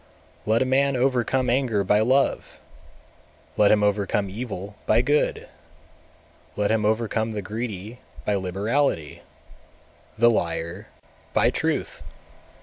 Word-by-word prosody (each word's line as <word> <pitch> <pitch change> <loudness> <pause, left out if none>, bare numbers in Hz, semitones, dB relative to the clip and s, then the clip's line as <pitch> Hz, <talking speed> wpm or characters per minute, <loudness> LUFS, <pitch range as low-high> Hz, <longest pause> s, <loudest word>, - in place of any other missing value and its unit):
223. 110 - -1
Let 115 - +3
a - - -3
man 135 +1 +2
overcome 130 0 +1
anger 120 -5 +1
by 105 +2 +3
love, 130 +5 +1 1.0
let 105 - +4
him 105 -1 +4
overcome 100 -1 0
evil 100 -2 -6
by 110 +2 +4
good; 145 +3 0 1.1
let 105 0 0
him 110 -1 +1
overcome 110 0 0
the 105 -1 -4
greedy 110 +1 -6 0.3
by 105 - +1
liberality, 95 - -1 1.0
the 120 +1 +5
liar 85 0 -3 0.5
by - - +3
truth! - - -2
110 Hz, 120 wpm, -24 LUFS, 100-125 Hz, 1.1 s, the